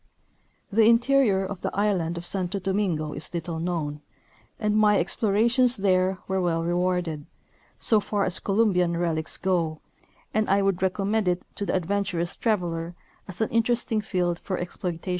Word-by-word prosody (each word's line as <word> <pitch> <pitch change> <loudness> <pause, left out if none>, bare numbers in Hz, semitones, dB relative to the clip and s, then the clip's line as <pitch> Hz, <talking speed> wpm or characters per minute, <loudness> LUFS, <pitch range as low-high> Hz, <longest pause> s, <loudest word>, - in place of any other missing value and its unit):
The 220 +1 +5
interior 235 -5 +3
of 190 -1 -6
the - - -1
island 185 -5 0
of 170 - -6
Santo 190 +1 -2
Domingo 190 -6 -1
is 145 - -7
little 165 -1 -3
known, 160 -4 -3 0.6
and 210 -1 0
my 210 -1 +4
explorations 230 +7 +2
there 190 -1 +2
were 190 0 0
well 165 -2 0
rewarded, 175 -3 -1 0.5
so 220 - +3
far 205 0 -1
as 185 - 0
Colum 210 +1 +2
bian 175 -1 +1
relics 160 -2 -1
go, 170 -4 0 0.5
and 215 0 +1
I 195 +1 +3
would 195 -2 0
recommend 195 +2 0
it 180 0 0
to 200 - -4
the - - 0
adventurous 185 -1 -1
traveller 175 -6 -1 0.3
as 190 +1 -7
an 220 - +1
interesting 230 -1 +1
field 175 -4 -1
for 185 - -3
exploitation. 175 0 -5
190 Hz, 160 wpm, -25 LUFS, 175-210 Hz, 0.6 s, The